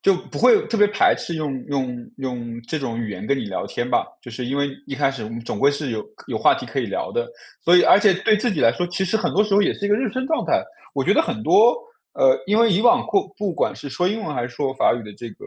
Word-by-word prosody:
就 195 Hz, -, +4 dB
不 185 Hz, +1 st, -8 dB
会 440 Hz, -4 st, +5 dB
特 230 Hz, -, -2 dB
别 210 Hz, -1 st, +5 dB
排 205 Hz, -, +3 dB
斥 170 Hz, -, -5 dB
用 140 Hz, -5 st, -4 dB
用 130 Hz, -4 st, -4 dB
用 120 Hz, -3 st, -5 dB
这 160 Hz, -, -2 dB
种 120 Hz, -5 st, -4 dB
语 115 Hz, -, -4 dB
言 105 Hz, -, -7 dB
跟 140 Hz, -, +1 dB
你 120 Hz, -, -4 dB
聊 95 Hz, -, -4 dB
天 120 Hz, -, -4 dB
吧， -, -, +1 dB, 0.2 s
就 120 Hz, -, -11 dB
是 120 Hz, +2 st, -6 dB
因 135 Hz, +3 st, -3 dB
为 140 Hz, 0 st, 0 dB, 0.2 s
一 135 Hz, -, -5 dB
开 135 Hz, 0 st, +1 dB
始 125 Hz, -5 st, -7 dB
我 -, -, -6 dB
们 115 Hz, +1 st, -6 dB
总 115 Hz, -3 st, -5 dB
归 140 Hz, +1 st, +4 dB
是 145 Hz, -2 st, -4 dB
有 110 Hz, -1 st, -3 dB
可 -, -, -16 dB
有 -, -, -2 dB
话 -, -, +4 dB
题 -, -, -6 dB
可 -, -, -5 dB
以 -, -, 0 dB
聊 -, -, -4 dB
的， 485 Hz, +1 st, -2 dB, 0.4 s
所 175 Hz, +2 st, +6 dB
以 180 Hz, -, +6 dB
而 -, -, +6 dB
且 205 Hz, -2 st, +4 dB
对 210 Hz, +4 st, +2 dB
自 240 Hz, +3 st, 0 dB
己 185 Hz, -, -2 dB
来 115 Hz, -, +5 dB
说 175 Hz, -, -2 dB
其 180 Hz, +2 st, -2 dB
实 190 Hz, +4 st, 0 dB
很 220 Hz, -, -1 dB
多 205 Hz, -, +3 dB
时 210 Hz, -2 st, 0 dB
候 205 Hz, -, +5 dB
也 -, -, +1 dB
是 205 Hz, -, -4 dB
一 -, -, -2 dB
个 205 Hz, -, +3 dB
认 240 Hz, -4 st, -2 dB
生 260 Hz, 0 st, -2 dB
状 320 Hz, +3 st, -1 dB
态。 -, -, +1 dB, 0.3 s
我 -, -, 0 dB
觉 -, -, +2 dB
得 320 Hz, -, +4 dB
很 230 Hz, -5 st, -4 dB
多， 230 Hz, +3 st, +5 dB, 0.4 s
呃， -, -, +3 dB
因 210 Hz, +3 st, +2 dB
为 230 Hz, -2 st, +4 dB
以 195 Hz, +4 st, +2 dB
往 240 Hz, -, +4 dB
过 390 Hz, -1 st, +1 dB
不 205 Hz, -2 st, -1 dB
管 170 Hz, -, -1 dB
是 145 Hz, -, -8 dB
说 140 Hz, +7 st, -1 dB
英 215 Hz, +4 st, -1 dB
文 150 Hz, -, -4 dB
还 125 Hz, -, -2 dB
是 120 Hz, -, -5 dB
说 135 Hz, +2 st, -3 dB
法 -, -, +3 dB
语 120 Hz, -, -6 dB
的 105 Hz, -, -10 dB
这 120 Hz, -, -8 dB
个 -, -, -13 dB
160 Hz, 340 characters per minute, -21 LUFS, 125-210 Hz, 0.4 s, 所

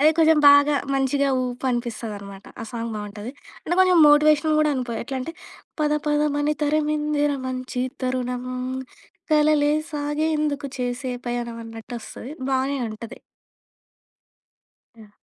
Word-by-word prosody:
అదే 305 Hz, +2 st, +6 dB
కొంచెం 320 Hz, -1 st, +5 dB
బాగా 285 Hz, +1 st, +6 dB, 0.2 s
మంచిగా 275 Hz, +1 st, +1 dB
ఊపు 250 Hz, +1 st, -5 dB
అనిపిస్తది 235 Hz, -3 st, -3 dB
అనమాట. 200 Hz, -1 st, -11 dB, 0.2 s
ఆ -, -, -4 dB
సాంగ్ 230 Hz, 0 st, -4 dB
బాగుంటది. 210 Hz, +3 st, -7 dB, 0.3 s
అంటే 350 Hz, -, 0 dB
కొంచెం 365 Hz, -2 st, +5 dB
మోటివేషన్ 300 Hz, +1 st, +5 dB
కూడా 305 Hz, -, +3 dB
అనుకో, 250 Hz, -2 st, -3 dB
ఎట్లంటే 265 Hz, +4 st, -5 dB, 0.5 s
పద 300 Hz, 0 st, +2 dB
పదమని 295 Hz, 0 st, +1 dB
తరమిందిర 300 Hz, -1 st, +1 dB
మంచి 255 Hz, -1 st, -3 dB, 0.2 s
తరుణం, 250 Hz, -1 st, -2 dB, 0.9 s
కలలే 300 Hz, -1 st, +4 dB, 0.2 s
సాగేందుకు 295 Hz, 0 st, -1 dB
చేసే 250 Hz, +1 st, -2 dB
పయణం 240 Hz, -1 st, -3 dB
అన్నట్టు 225 Hz, +1 st, -9 dB
వస్తది. 245 Hz, +4 st, -9 dB, 0.2 s
బానే 270 Hz, +1 st, 0 dB
ఉంటది. 225 Hz, +3 st, -9 dB, 1.8 s
యాహ్! 215 Hz, -2 st, -16 dB
275 Hz, 120 wpm, -23 LUFS, 245-300 Hz, 1.8 s, అదే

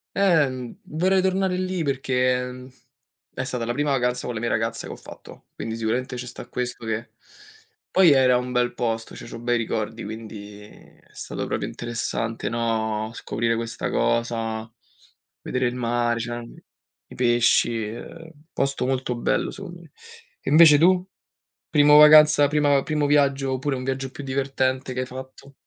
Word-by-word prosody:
Eh, 175 Hz, -7 st, +4 dB
mhmm, 125 Hz, -2 st, -7 dB
vorrei 185 Hz, +5 st, +1 dB
tornare 190 Hz, 0 st, 0 dB
lì 185 Hz, -2 st, -2 dB
perché, 130 Hz, -2 st, +1 dB
ehm, 125 Hz, 0 st, -7 dB, 0.6 s
è 130 Hz, -, -3 dB
stata 125 Hz, -3 st, -3 dB
la 120 Hz, -, -2 dB
prima 145 Hz, +2 st, 0 dB
vacanza 125 Hz, -2 st, 0 dB
con 125 Hz, -, -3 dB
le 115 Hz, -, -4 dB
mie 120 Hz, -, -1 dB
ragazza 115 Hz, 0 st, -2 dB
che -, -, -7 dB
ho -, -, -8 dB
fatto, -, -, -14 dB
quindi 110 Hz, 0 st, -5 dB
sicuramente 125 Hz, +3 st, -2 dB
ci 125 Hz, -, -5 dB
sta 125 Hz, -, -9 dB
questo 125 Hz, -1 st, -5 dB
che 110 Hz, +1 st, -4 dB, 0.8 s
poi 185 Hz, -4 st, +6 dB
era 130 Hz, -2 st, +5 dB
un 125 Hz, 0 st, -4 dB
bel 125 Hz, -1 st, +1 dB
posto, 115 Hz, -2 st, -3 dB
cioè -, -, -10 dB
c'ho -, -, -8 dB
bei 120 Hz, +1 st, 0 dB
ricordi 110 Hz, 0 st, -3 dB
quindi 105 Hz, -2 st, -8 dB
è 105 Hz, -, -17 dB
stato -, -, -6 dB
proprio -, -, -3 dB
interessante, 115 Hz, -1 st, -3 dB
no, 110 Hz, -2 st, -1 dB
scoprire 115 Hz, 0 st, -2 dB
questa 115 Hz, 0 st, -4 dB
cosa, 115 Hz, -1 st, -1 dB, 0.7 s
vedere 130 Hz, 0 st, -1 dB
il 120 Hz, -, -3 dB
mare, 120 Hz, -1 st, 0 dB
c'erano, 120 Hz, 0 st, -5 dB
mhmm, -, -, -14 dB, 0.5 s
i -, -, -12 dB
pesci, 120 Hz, -1 st, +2 dB
ehm, 160 Hz, +9 st, -9 dB, 0.2 s
posto 135 Hz, -2 st, -1 dB
molto 130 Hz, -2 st, -1 dB
bello 120 Hz, -, 0 dB
secondo 175 Hz, -3 st, -9 dB
me. 160 Hz, -, -18 dB, 0.5 s
E -, -, -4 dB
invece 155 Hz, 0 st, +8 dB
tu? 180 Hz, +2 st, +4 dB, 0.6 s
Primo 150 Hz, -1 st, +6 dB
vacanza, 150 Hz, -1 st, +8 dB
prima 145 Hz, -2 st, +2 dB
primo 150 Hz, -2 st, 0 dB
viaggio 140 Hz, -2 st, +2 dB
oppure 135 Hz, +2 st, -1 dB
un 130 Hz, -, -5 dB
viaggio 135 Hz, 0 st, -3 dB
più 145 Hz, -, -8 dB
divertente 130 Hz, -1 st, -1 dB
che 125 Hz, -, -4 dB
hai -, -, -3 dB
fatto? 130 Hz, +2 st, -11 dB
125 Hz, 170 wpm, -24 LUFS, 115-145 Hz, 0.8 s, invece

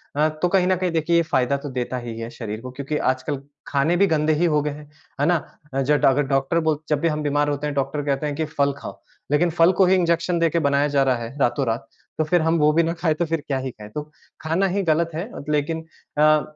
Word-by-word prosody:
अ, 150 Hz, +2 st, +3 dB
तो 155 Hz, +3 st, -1 dB
कहीं 180 Hz, 0 st, +2 dB
न 185 Hz, -, +3 dB
कहीं 180 Hz, 0 st, -1 dB
देखिए 165 Hz, +1 st, +1 dB
ये 170 Hz, -, +5 dB
फ़ायदा 130 Hz, +2 st, +2 dB
तो 145 Hz, -, -4 dB
देता 125 Hz, +1 st, -3 dB
ही 115 Hz, -1 st, -6 dB
है 115 Hz, 0 st, -5 dB
शरीर 110 Hz, -2 st, -6 dB
को 125 Hz, -, -7 dB
क्योंकि 140 Hz, +3 st, -3 dB, 0.2 s
आजकल 135 Hz, +2 st, -4 dB, 0.3 s
खाने 145 Hz, +5 st, +1 dB
भी 200 Hz, -, +4 dB
गंदे 155 Hz, -1 st, +2 dB
ही 160 Hz, +3 st, +1 dB
हो 150 Hz, -3 st, +2 dB
गए 150 Hz, -, -2 dB
हैं, 150 Hz, +1 st, -10 dB, 0.4 s
है -, -, +3 dB
ना? 175 Hz, 0 st, +4 dB, 0.4 s
अ, 135 Hz, -, 0 dB
ज 135 Hz, +2 st, 0 dB
अगर 135 Hz, +2 st, +4 dB
डॉक्टर 135 Hz, +5 st, +2 dB
बोल 155 Hz, -, +1 dB
जब 150 Hz, -2 st, +2 dB
भी 170 Hz, -, +2 dB
हम 150 Hz, -1 st, -1 dB
बीमार 145 Hz, 0 st, +1 dB
होते 145 Hz, +1 st, -2 dB
हैं 145 Hz, -, -3 dB
डॉक्टर 140 Hz, +2 st, -1 dB
कहते 140 Hz, +1 st, 0 dB
हैं 145 Hz, -1 st, -2 dB
कि 160 Hz, -, -1 dB
फल 140 Hz, -2 st, 0 dB
खाओ, -, -, -9 dB, 0.3 s
लेकिन 170 Hz, +4 st, +3 dB
फल 165 Hz, +2 st, +4 dB
को 190 Hz, -, +7 dB
ही 185 Hz, -, +4 dB
इंजेक्शन 170 Hz, -1 st, +1 dB
देके 165 Hz, 0 st, +2 dB
बनाया 140 Hz, +1 st, +2 dB
जा 140 Hz, -1 st, +2 dB
रहा 130 Hz, -1 st, +2 dB
है 125 Hz, +5 st, -8 dB
रातों-रात, 120 Hz, -2 st, 0 dB, 0.3 s
तो 155 Hz, -, +2 dB
फिर 175 Hz, +3 st, +2 dB
हम 165 Hz, +1 st, +2 dB
वो 150 Hz, 0 st, +5 dB
भी 170 Hz, -, +4 dB
ना 165 Hz, +1 st, 0 dB
खाएँ 165 Hz, -2 st, 0 dB
तो 170 Hz, -, 0 dB
फिर 165 Hz, -1 st, -2 dB
क्या 135 Hz, -, 0 dB
ही 130 Hz, 0 st, -4 dB
खाएँ, 105 Hz, -2 st, -12 dB
तो 150 Hz, +6 st, -7 dB, 0.3 s
खाना 165 Hz, +5 st, +1 dB
ही 195 Hz, +2 st, 0 dB
गलत 165 Hz, 0 st, +1 dB
है। 175 Hz, +8 st, -4 dB, 0.2 s
लेकिन 160 Hz, +2 st, -1 dB, 0.3 s
अ, 155 Hz, 0 st, +5 dB
150 Hz, 260 wpm, -23 LUFS, 140-165 Hz, 0.4 s, को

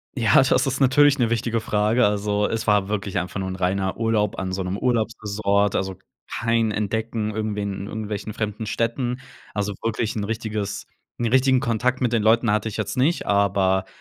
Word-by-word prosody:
Ja, 115 Hz, -5 st, +2 dB
das 135 Hz, -, +2 dB
ist 135 Hz, +1 st, -2 dB
natürlich 140 Hz, +2 st, +5 dB
'ne 115 Hz, -2 st, +2 dB
wichtige 115 Hz, 0 st, 0 dB
Frage. 105 Hz, +3 st, +2 dB
Also, 105 Hz, 0 st, 0 dB
es 115 Hz, -, -3 dB
war 105 Hz, -2 st, +3 dB
wirklich 100 Hz, -3 st, -2 dB
einfach 90 Hz, +2 st, -3 dB
nur 95 Hz, -, -3 dB
'n 95 Hz, -, -4 dB
reiner 95 Hz, +1 st, -1 dB
Urlaub 110 Hz, -3 st, 0 dB
an 95 Hz, -1 st, -3 dB
so 95 Hz, 0 st, -2 dB
'nem 90 Hz, +1 st, -3 dB
Urlaubsressort, 105 Hz, -3 st, 0 dB
also 95 Hz, -1 st, -2 dB, 0.3 s
kein 115 Hz, -1 st, +1 dB
Entdecken 110 Hz, +1 st, -2 dB
irgendwie 105 Hz, -1 st, -2 dB
in 100 Hz, 0 st, -4 dB
irgendwelchen 105 Hz, -1 st, -5 dB
fremden 110 Hz, 0 st, -3 dB
Städten. 120 Hz, +4 st, -1 dB, 0.3 s
Also 105 Hz, 0 st, -1 dB
wirklich 115 Hz, 0 st, -1 dB
'n 105 Hz, -2 st, -2 dB
richtiges 110 Hz, -2 st, -4 dB, 0.3 s
'n 120 Hz, -, -2 dB
richtigen 130 Hz, +1 st, +3 dB
Kontakt 125 Hz, +1 st, 0 dB
mit 120 Hz, -2 st, +1 dB
den 115 Hz, -3 st, +2 dB
Leuten 115 Hz, +1 st, +3 dB
hatte 105 Hz, +1 st, +1 dB
ich 105 Hz, -, -6 dB
jetzt 110 Hz, +4 st, -3 dB
nicht, 155 Hz, +7 st, +2 dB
aber 95 Hz, -2 st, +2 dB
110 Hz, 185 wpm, -23 LUFS, 100-115 Hz, 0.3 s, natürlich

